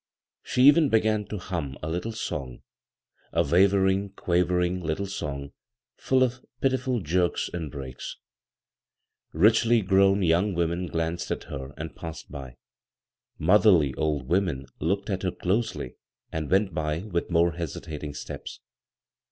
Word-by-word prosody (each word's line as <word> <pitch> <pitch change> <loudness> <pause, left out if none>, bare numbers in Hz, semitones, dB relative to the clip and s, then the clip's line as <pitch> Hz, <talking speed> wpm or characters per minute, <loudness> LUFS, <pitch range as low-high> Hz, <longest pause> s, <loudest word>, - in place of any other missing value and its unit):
She 125 - +1
even 145 +2 +7
began 110 -2 +2
to 105 +1 -5
hum 85 -7 -4
a - - -2
little 90 +8 -2
song 70 - -5 0.3
— - - -39
a - - +5
wavering, 95 +3 +3
quavering 90 0 0
tittle 85 +4 -2
song 70 -8 -5 0.4
full 130 -1 +2
of 130 0 -2 0.2
pitiful 130 -3 0
jerks 90 +1 0
and 85 -4 -4
breaks. 65 -3 -7 1.1
Richly 110 +6 +4
gowned 95 0 +4
young 90 +4 +2
women 85 +1 -1
^anced 80 +1 -2
at - - -2
her 65 -1 -6
and 80 +1 -6
passed 80 -4 -8
by. 65 -4 -8 0.8
Motherly 90 -5 +5
old 75 -1 -1
women 85 -7 0
looked 100 +6 -1
at 95 - -1
her 95 - 0
dosety 105 +6 -2 0.3
and 80 -2 -3
went 95 -1 +2
by 80 +1 -2
with 90 -5 -2
more 85 0 +3
hesitating 75 -3 -6
steps. - - -7
90 Hz, 135 wpm, -26 LUFS, 80-100 Hz, 1.1 s, even